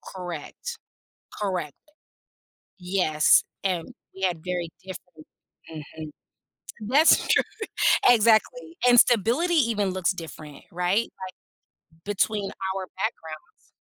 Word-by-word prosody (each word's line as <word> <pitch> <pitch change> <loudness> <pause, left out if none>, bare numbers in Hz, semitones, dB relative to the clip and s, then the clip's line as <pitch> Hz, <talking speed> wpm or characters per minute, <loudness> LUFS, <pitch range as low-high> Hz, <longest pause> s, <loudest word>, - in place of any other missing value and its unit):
Correct, 180 - -7 0.6
correct, 180 -7 -3 1.0
yes, 180 -4 +3 0.2
and 180 -4 -2 0.2
we 190 - -11
had 180 -4 -1
very 180 -2 -3
different 180 -4 -11 0.4
mhm, 155 0 -9 0.8
that's 295 +6 +5
true, - - +4 0.7
exactly, 240 - +3
and 245 0 +6
stability 245 - +2
even 230 - +1
looks 185 0 0
different, 155 -4 -10
right, 180 +6 0 0.2
like, 185 - -7 0.7
between 205 0 -1 0.3
our 190 -1 -4
backgrounds. 160 -7 -6
185 Hz, 95 wpm, -25 LUFS, 165-225 Hz, 1.0 s, and